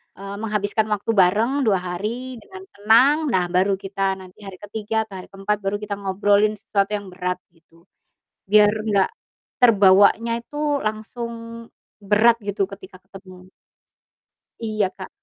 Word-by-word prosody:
eee, 195 +1 -8
menghabiskan 215 0 -1
waktu 205 +2 -4
bareng 225 +9 +3
2 195 -3 +3
hari 225 +8 -5
dengan 380 - -12
tenang, 230 +8 +4 0.2
nah 180 -1 +2
baru 190 +2 +2
kita 195 0 -2
nanti 185 0 -15
hari 195 - -8
ke-3 220 +1 -2
atau 195 -2 -9
hari 185 - -11
ke-4 195 +2 -2
baru 195 - 0
kita 205 -1 -4
ngobrolin 205 +2 +2
sesuatu 200 -1 -1
yang 205 -1 -6
berat 180 0 -3 0.2
gitu. 165 0 -26 0.7
Biar 210 0 +6
enggak 205 -3 +2 0.5
terbawanya 205 +1 +5
itu 295 - -11 0.3
langsung 220 +2 -4 0.7
berat 215 +4 +4
gitu 200 -1 -1
ketika 190 -1 -12
ketemu. 185 -1 -14 1.1
Iya 215 -4 -1
Kak. 190 - -8
205 Hz, 140 wpm, -22 LUFS, 190-220 Hz, 1.1 s, Biar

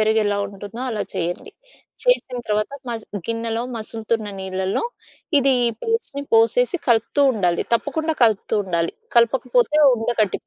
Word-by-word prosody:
పెరుగెలా 215 -1 +2
ఉంటుందో 205 +3 -9
అలా 215 -3 -2
చేయండి. 175 0 -3 0.5
చేసిన - - +2
తర్వాత 210 +3 0 0.2
మసు 225 -3 -5
గిన్నెలో 230 0 -2
మసులుతున్న 220 0 -3
నీళ్లలో 190 0 -2 0.6
ఇది 270 -1 +3 0.3
పేస్ట్‌ని 455 -11 -2
పోసేసి 360 - +4
కలుపుతూ 230 +4 +3
ఉండాలి. 180 -6 +1
తప్పకుండా 315 +6 -1
కలుపుతూ 220 -2 +1
ఉండాలి. 170 -3 -1 0.2
కలపకపోతే 245 +3 +3 0.2
ఉండ 225 -1 -4
కట్టిప్ 210 -3 0
225 Hz, 120 wpm, -21 LUFS, 205-250 Hz, 0.6 s, పోసేసి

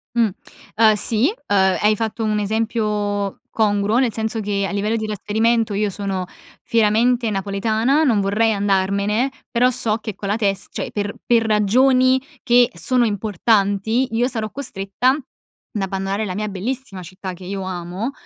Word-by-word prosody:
Mh. 230 -2 +3 0.5
Uhm, 220 0 +5
sì, 225 - +3 0.2
uhm, 205 - +1 0.3
hai 215 +1 +4
fatto 225 +1 -3
un 215 -1 0
esempio 210 -2 -1
congruo, 210 0 +1
nel 250 -3 +2
senso 220 +1 -2
che, 200 -1 -1
a - - -5
livello 205 +2 -1
di 220 -1 -2
trasferimento, 220 +2 0
io 205 +1 0
sono 195 -1 -3 0.4
fieramente 230 +1 +2
napoletana, 215 +8 +1
non 235 -8 +3
vorrei 215 +3 +2
andarmene, 200 +5 +1 0.2
però 245 +1 +3
so 230 -3 -1
che 215 -3 -6
con 200 - -6
la 205 - +2
tes 200 -3 0
cioè - - -5
per 205 -1 -3
per 235 -1 +3
ragioni 255 +5 +3 0.2
che 245 -1 +5
sono 240 +8 +1
importanti, 210 +2 +1
io 240 +2 +2
sarò 225 -4 -3
costretta 250 0 0 0.6
ad 205 - -1
abbandonare 195 +2 -2
la 185 -3 -4
mia 210 +1 -2
bellissima 205 +1 -4
città 185 +1 -7
che 180 +1 -11
io 195 +1 -4
amo, 185 +5 -4
215 Hz, 160 wpm, -20 LUFS, 200-230 Hz, 0.6 s, Uhm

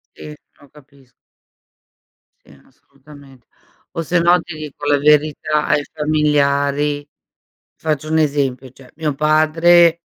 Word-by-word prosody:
Sì, 150 - -10 0.3
lo 145 - -19
capis 140 -3 -22 1.2
Sì 70 - -22
assolutamente. 140 -1 -19 0.5
O 165 - -4
sennò 175 +2 +2
ti 170 0 -10
dico 150 -1 -9
la 145 0 +2
verità, 150 +1 +1
ai 145 - +1
familiari 145 -1 0 0.7
faccio 155 -1 -3
un 160 - +1
esempio, 140 -4 -1
cioè 130 0 -18
mio 155 -2 -3
padre 165 +3 +3
150 Hz, 110 wpm, -18 LUFS, 140-155 Hz, 1.2 s, padre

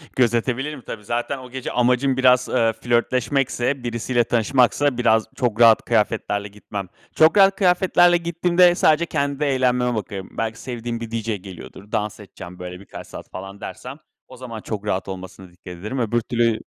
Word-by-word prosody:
Gözetebilirim 130 +4 0
tabii. 105 -3 -8
Zaten 120 +5 -2
o 130 -1 -11
gece 130 0 -5
amacım 125 +2 +2
biraz, 125 -1 +4
eee, 115 -3 +2
flörtleşmekse, 125 +2 0
birisiyle 120 +1 0
tanışmaksa 125 +4 +2
biraz 110 -2 +3
çok 120 -3 -1
rahat 115 -2 +6
kıyafetlerle 105 -2 0
gitmem. 100 -1 -7 0.3
Çok 160 +5 +5
rahat 195 0 +6
kıyafetlerle 180 -2 +4
gittiğimde 175 +1 +3
sadece 160 -2 +3
kendi 140 -2 -2
eğlenmeme 125 -3 +1
bakıyorum. 100 -3 -5
Belki 115 0 -3
sevdiğim 120 -2 -5
bir 115 -1 -7
DJ 115 -2 -3
geliyordur. 95 +2 -12
Dans 105 0 -2
edeceğim 90 -3 -11
böyle 90 0 -7
birkaç 100 - -11
saat - - -10
falan 95 +2 -9
dersem 130 +3 -8 0.3
o 130 - -13
zaman 120 -3 -8
çok 105 -1 -5
rahat 95 -2 -2
olmasına 95 -1 -9
dikkat 90 +2 -21
ederim, 105 +9 -5
öbür 120 0 0
türlü 115 -1 0
120 Hz, 160 wpm, -22 LUFS, 105-130 Hz, 0.3 s, rahat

